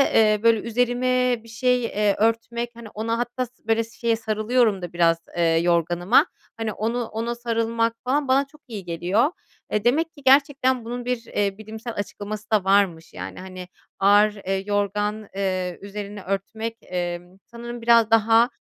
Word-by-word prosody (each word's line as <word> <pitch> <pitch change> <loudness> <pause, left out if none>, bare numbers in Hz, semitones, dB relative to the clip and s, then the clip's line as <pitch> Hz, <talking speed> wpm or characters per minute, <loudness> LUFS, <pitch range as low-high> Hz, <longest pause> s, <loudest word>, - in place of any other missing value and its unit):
eee, 215 -1 +5
böyle 230 -1 +5
üzerime 245 +2 +1
bir - - -16
şey, 250 +2 +1
eee, 210 -3 +1
örtmek, 230 +2 0
hani 230 -2 -10
ona 225 +2 -2
hatta 245 +2 -2
sı 245 -2 -25
böyle 225 0 +2
şeye 230 0 -1
sarılıyorum 220 -1 +1
da 175 -1 -6
biraz. 170 -1 +3 0.2
Eee, 170 - +2
yorganıma, 170 +4 +3 0.3
hani 225 -2 -2
onu 230 +4 -2
ona 230 +2 -3
sarılmak 230 -1 0
falan 275 +3 0
bana 270 +2 +3
çok 300 +1 -21
iyi 210 -6 -7
geliyor. 180 - +1 0.4
Eee, 210 - 0
demek 310 +8 +2
ki 285 - -15
gerçekten 265 -2 +4
bunun 245 +1 -5
bir, 245 -2 -2
eee, 200 -1 -1
bilimsel 220 +2 -7
açıklaması 210 +1 -6
da 215 -3 +3
varmış. 190 -4 +2
Yani, - - -7
hani, 185 -1 -8 0.3
ağır, 205 +2 +5
eee, 195 -1 -3
yorgan, 205 +1 -1
eee, 185 -2 -2
üzerini 205 0 -7
örtmek, 220 +4 -3
emm, 175 0 -5
sanırım 240 0 -8
biraz 230 -1 +5
daha, 225 +2 +5
220 Hz, 160 wpm, -23 LUFS, 200-240 Hz, 0.4 s, eee